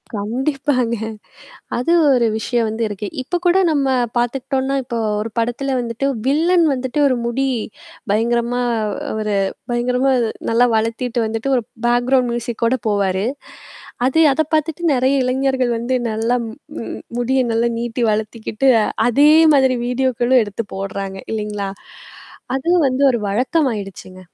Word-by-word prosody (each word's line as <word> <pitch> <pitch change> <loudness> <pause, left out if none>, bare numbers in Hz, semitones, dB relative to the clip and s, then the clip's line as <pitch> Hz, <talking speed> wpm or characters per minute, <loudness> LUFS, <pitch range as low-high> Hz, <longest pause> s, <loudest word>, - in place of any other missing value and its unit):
கண்டிப்பாங்க. 250 +2 -1 0.8
அது 250 +8 0 0.2
ஒரு 250 -3 +3
விஷயம் 230 0 0
வந்து 225 +1 -3
இருக்கு. 205 0 -5
இப்ப 350 +7 -2
கூட 350 +2 +4
நம்ம 280 -3 +1 0.3
பார்த்துக்கிட்டோம்னா, 265 +2 -1
இப்போ 240 -1 -4 0.2
ஒரு 225 - -4
படத்துல 245 +4 -1
வந்துட்டு 235 +2 -3 0.2
வில்லன் 335 +6 +3
வந்துட்டு 260 +3 -3
ஒரு 255 - +2
முடி 265 +3 0 0.6
பயங்கரமா 235 +3 +1 0.6
ஒரு 215 -1 -1 0.4
பயங்கரமா 250 +2 +1 0.4
நல்லா 235 +2 +4
வளர்த்திட்டு 230 +2 -1
வந்துட்டு 225 +4 -3
ஒரு 245 - +2 0.2
பேக்ரவுண்ட் 245 +1 +2
மியூசிக் 235 -1 -4
கூட 230 +3 +3
போவாரு. 195 -1 0 0.8
அது 295 +5 +1
அத 315 - +1
பார்த்துட்டு 315 +2 -1
நெறைய 260 +2 +2
இளைஞர்கள் 260 -1 0
வந்து 245 +3 -1 0.2
நல்லா 225 +3 0
ம் 220 - -8 0.3
ம் - - -6 0.2
முடிய 265 +2 +1
நல்லா 230 +1 +1
நீட்டி 240 +1 -2
வளர்த்திக்கிட்டு 220 +3 -1 0.4
அதே 285 +5 +5 0.3
மாதிரி 265 -2 +3
வீடியோக்களும் 250 -1 +2
எடுத்து 205 +1 -5
போடுறாங்க 195 0 -5
இல்லைங்களா? 210 -2 -3 0.9
அது 330 +6 -3 0.2
வந்து 255 +2 -1
ஒரு 235 -3 -2
வழக்கமாயிடுச்சுங்க. 210 - -2
245 Hz, 130 wpm, -19 LUFS, 225-265 Hz, 0.9 s, அதே